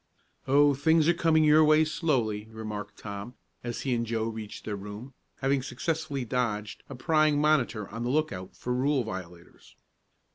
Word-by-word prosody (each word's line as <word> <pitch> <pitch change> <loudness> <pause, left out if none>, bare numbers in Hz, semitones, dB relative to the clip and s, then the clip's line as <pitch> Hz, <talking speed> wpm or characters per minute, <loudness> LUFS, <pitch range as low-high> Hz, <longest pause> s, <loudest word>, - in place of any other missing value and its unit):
"Oh, 145 +2 +5
things 160 +3 +3
are 170 - +5
coming 165 -2 +3
your 155 +1 +6
way 155 +1 +5
slowly," 120 -10 -1
remarked 105 -2 -7
Tom, 100 +4 -7 0.3
as 120 -1 -4
he 130 - -1
and 115 -1 0
Joe 115 -1 -2
reached 110 -2 -6
their 105 - -3
room, 105 +6 -8 0.3
having 135 0 +2
successfully 140 +1 -3
dodged 110 -4 -2
a 135 - -7
prying 155 +2 +2
monitor 130 -9 +1
on 115 +3 -7
the 120 - -1
look 155 +3 +1
out 95 0 -8
for 125 - -3
rule 135 +1 +1
violators. 90 -4 -9
125 Hz, 170 wpm, -28 LUFS, 110-150 Hz, 0.3 s, your